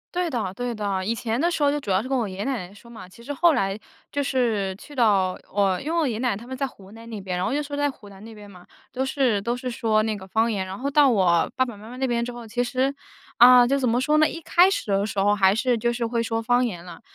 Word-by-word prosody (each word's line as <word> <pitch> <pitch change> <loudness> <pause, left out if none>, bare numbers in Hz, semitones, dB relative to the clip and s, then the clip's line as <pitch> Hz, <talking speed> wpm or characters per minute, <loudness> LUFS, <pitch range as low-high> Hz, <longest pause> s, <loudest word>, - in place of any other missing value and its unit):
对 355 -2 0
的， 215 -8 -3
对 245 +2 -4
的， 200 -3 -2
以 225 - 0
前 230 +1 -3
的 345 +1 +2
时 310 - -3
候 285 - +4
就 295 - 0
主 210 -9 -4
要 185 +2 +2
是 255 - -7
跟 265 -1 0
我 235 - 0
爷 190 -1 -7
爷 205 - -3
奶 230 -10 -3
奶 - - -17
说 235 +3 -16
嘛， 225 -5 -10
其 230 - -16
实 285 +5 -6
后 340 +4 +4
来 195 -6 0 0.4
就 285 0 0
是 225 -8 0
去 290 - -13
到 200 -6 +2 0.2
我 195 -2 +2
因 310 - -4
为 335 - +1
我 305 - +1
爷 235 - -1
爷 215 - -4
奶 250 -1 0
奶 200 - -1
他 235 +3 -12
们 260 - -6
在 275 +1 -1
湖 200 -5 -12
南 230 +1 -12
那 215 -3 -6
边。 185 -2 -4
然 180 - -1
后 - - -1
就 295 - 0
说 285 0 -6
在 290 -1 0
湖 205 - -16
南 195 +1 -14
那 225 0 -11
边 205 -1 -13
嘛， 180 -2 -15 0.3
都 265 +1 -1
是 255 -7 +1
都 235 +4 -2
是 250 0 -4
说 220 -2 +1
那 220 -1 -1
个 190 -1 -9
方 225 +4 +1
言， 195 -4 -2
然 190 +3 -7
后 280 +2 -2
到 285 -1 +5
我 180 -7 +2
爸 260 - +3
爸 240 -4 -8
妈 215 +3 -12
妈 250 - -9
那 265 0 -1
边 235 -1 0
之 245 - -4
后， 240 -2 -10
其 245 +3 -1
实， 260 +3 -1 0.4
啊， 245 0 +8
就 275 +2 +2
怎 255 -3 0
么 240 +2 +1
说 300 +4 +1
呢， 310 - +4
一 330 - -7
开 355 +4 +4
始 - - -3
的 200 +1 +1
时 205 -2 -3
候 205 +1 +3
还 190 -1 +4
是 235 +2 +1
就 235 +2 0
是 235 0 -2
会 230 0 -1
说 225 0 -2
方 245 +2 +2
言 180 -6 -5
了， 175 - -11
235 Hz, 345 characters per minute, -24 LUFS, 200-260 Hz, 0.4 s, 啊